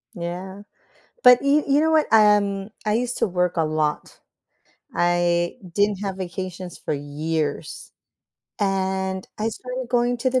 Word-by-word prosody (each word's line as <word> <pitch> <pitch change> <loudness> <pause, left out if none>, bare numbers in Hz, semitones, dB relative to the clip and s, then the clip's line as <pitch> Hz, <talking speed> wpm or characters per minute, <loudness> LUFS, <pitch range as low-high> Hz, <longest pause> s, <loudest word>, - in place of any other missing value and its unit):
Yeah, 180 +3 -6 0.6
but 250 -1 +8
you 285 +2 +3
you 280 +1 +3
know 320 +1 +2
what, 315 -1 +3
um, 205 -2 +4 0.2
I 210 - +2
used 245 +2 -1
to - - +2
work 180 -2 0
a 165 - +2
lot. 155 -1 -2 0.7
I 175 0 +1 0.2
didn't 205 0 +1
have 195 -1 -3
vacations 185 -1 -6
for - - -3
years, 150 +1 -3 0.7
and 190 -1 -1
I 215 +1 0
started 250 +2 -6
going 245 0 +1
to 255 +2 0
the 255 0 +2
190 Hz, 145 wpm, -23 LUFS, 175-235 Hz, 0.7 s, but